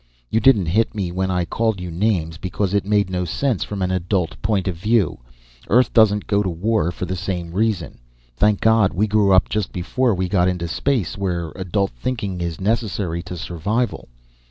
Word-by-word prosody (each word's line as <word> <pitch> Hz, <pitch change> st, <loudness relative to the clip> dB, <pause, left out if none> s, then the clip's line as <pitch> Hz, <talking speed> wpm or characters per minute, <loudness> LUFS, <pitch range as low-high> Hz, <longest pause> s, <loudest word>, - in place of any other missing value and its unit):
You 110 Hz, -, +3 dB
didn't 115 Hz, -5 st, +4 dB
hit 110 Hz, +8 st, +1 dB
me 95 Hz, -4 st, -2 dB
when 95 Hz, +1 st, -1 dB
I 90 Hz, -2 st, 0 dB
called 110 Hz, +1 st, -1 dB
you 90 Hz, -1 st, -6 dB
names, 85 Hz, -3 st, -1 dB
because 95 Hz, +1 st, -2 dB
it 100 Hz, -1 st, 0 dB
made 105 Hz, -1 st, +2 dB
no 90 Hz, -1 st, -1 dB
sense 115 Hz, -, -1 dB
from 100 Hz, -2 st, -4 dB
an 90 Hz, -, 0 dB
adult 90 Hz, -, -1 dB
point 100 Hz, -, 0 dB
of 95 Hz, -, -1 dB
view. 105 Hz, 0 st, +1 dB, 0.5 s
Earth 125 Hz, +4 st, +4 dB
doesn't 105 Hz, -3 st, +4 dB
go 100 Hz, -1 st, +1 dB
to 95 Hz, -, -1 dB
war 90 Hz, 0 st, 0 dB
for 90 Hz, -, -5 dB
the 95 Hz, -, -3 dB
same 90 Hz, -1 st, -4 dB
reason. 100 Hz, -2 st, -1 dB, 0.4 s
Thank 105 Hz, -, +2 dB
God, 110 Hz, -3 st, +4 dB
we 105 Hz, +4 st, +2 dB
grew 105 Hz, -2 st, +2 dB
up 95 Hz, 0 st, +5 dB
just 105 Hz, -2 st, -2 dB
before 115 Hz, +6 st, 0 dB
we 95 Hz, 0 st, -1 dB
got 90 Hz, -1 st, +2 dB
into 90 Hz, -2 st, -1 dB
space, 105 Hz, -, -1 dB
where 85 Hz, -4 st, -2 dB
adult 95 Hz, +1 st, -1 dB
thinking 95 Hz, -, -4 dB
is 85 Hz, -2 st, -3 dB
necessary 100 Hz, -5 st, -1 dB
to 90 Hz, 0 st, -7 dB
survival!" 100 Hz, +9 st, -2 dB
95 Hz, 195 wpm, -21 LUFS, 90-105 Hz, 0.5 s, up